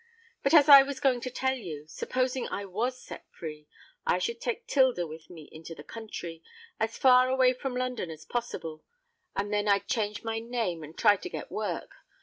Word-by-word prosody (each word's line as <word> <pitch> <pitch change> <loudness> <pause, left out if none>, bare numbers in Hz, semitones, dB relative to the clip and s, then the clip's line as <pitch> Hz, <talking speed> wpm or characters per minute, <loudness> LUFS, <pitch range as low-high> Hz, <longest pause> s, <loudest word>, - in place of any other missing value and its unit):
But, - - +3
as 295 -2 +8
I 280 -2 +11
was 275 -1 -3
going 255 -3 +2
to 255 - -3
tell 260 +1 0
you—supposing 245 - -3
I 200 - -4
was 235 +7 -2
set - - -11
free, 150 -2 -8 0.4
I - - +2
would 465 +1 -6
take 475 -1 -3
'Tilda 260 - +3
with 160 0 -10
me 160 -4 -11
into 165 +1 -9
the 145 - -11
country—as 215 +1 -7
far 255 -1 +6
away 260 -1 +4
from 255 0 -4
London 250 -7 -2
as 155 -1 -9
possible; 165 -10 -4 0.5
and 205 +1 -2
then 205 0 +1
I'd 200 -1 +2
change 210 -3 -1
my 225 0 -2
name, 225 -8 -2
and 155 +2 -11
try 205 -2 +5
to 365 - -7
get - - -7
work. - - -3
225 Hz, 185 wpm, -29 LUFS, 170-255 Hz, 0.5 s, I